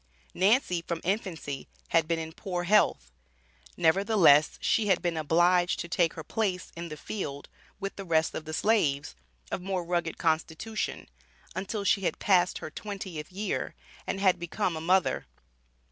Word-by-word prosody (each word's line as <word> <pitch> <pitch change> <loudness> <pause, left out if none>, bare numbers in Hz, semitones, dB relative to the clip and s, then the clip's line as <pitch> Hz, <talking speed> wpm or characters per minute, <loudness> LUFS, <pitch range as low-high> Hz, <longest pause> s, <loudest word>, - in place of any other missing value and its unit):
Nancy, 190 -2 +3
from 170 0 -4
infancy, 170 - -3 0.2
had 165 -2 +3
been 165 0 +1
in 160 0 -5
poor 180 -2 -3
health. 170 - +3 0.7
Nevertheless, 165 -4 +5
she 220 -2 +1
had 190 - +4
been 175 -2 -1
obliged 175 +3 +3
to - - -3
take 170 -1 +1
her 160 - -6
place 190 0 -2
in 170 0 -6
the 155 - -7
field 145 -5 -5 0.3
with 195 -1 -5
the 195 - -5
rest 160 -3 +1
of 155 - -5
the 155 - -6
slaves, 145 - +1 0.4
of - - -2
more 185 -1 -2
rugged 170 -2 -1
constitution, 160 +6 -2 0.5
until 195 +3 -3
she 200 - +3
had 185 - -1
passed 185 -3 +3
her 155 - -7
twentieth 190 -5 -6
year, 200 +3 -3 0.3
and 195 - -2
had 185 -2 +3
become 175 +1 -1
a 160 - -4
mother. 185 +3 +2
175 Hz, 160 wpm, -28 LUFS, 160-195 Hz, 0.7 s, Nevertheless